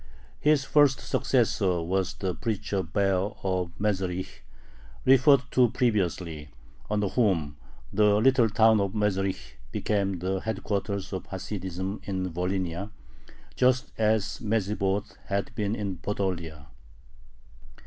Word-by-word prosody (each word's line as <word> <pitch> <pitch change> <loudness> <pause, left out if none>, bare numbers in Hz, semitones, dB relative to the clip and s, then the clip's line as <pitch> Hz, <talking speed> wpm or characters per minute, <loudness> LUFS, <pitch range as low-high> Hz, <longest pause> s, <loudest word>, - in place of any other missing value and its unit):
His 150 -2 +3
first 145 -2 +4
successor 105 -8 +1
was 95 +3 -1
the 95 -2 -2
preacher 105 -3 -2
Baer 95 +3 0
of 90 -2 0
Mezherich, 95 -3 -2 0.7
referred 135 +1 +6
to 125 -2 +4
previously, 90 - -1 0.4
under 105 -1 +1
whom 85 - +1 0.4
the 105 0 +4
little 120 +1 +4
town 110 0 +4
of 100 +1 -2
Mezherich 95 - -1
became 100 -3 0
the 95 +2 -2
headquarters 100 -2 -3
of 95 -1 -5
Hasidism 95 0 -5
in 95 -3 -3
Volhynia, 90 +1 -2 0.7
just 130 +2 +2
as 110 -2 +1
Medzhibozh 105 -2 -1
had 100 -1 -2
been 105 0 -1
in 100 -4 -3
Podolia. 85 -6 -3
100 Hz, 110 wpm, -27 LUFS, 95-110 Hz, 0.7 s, referred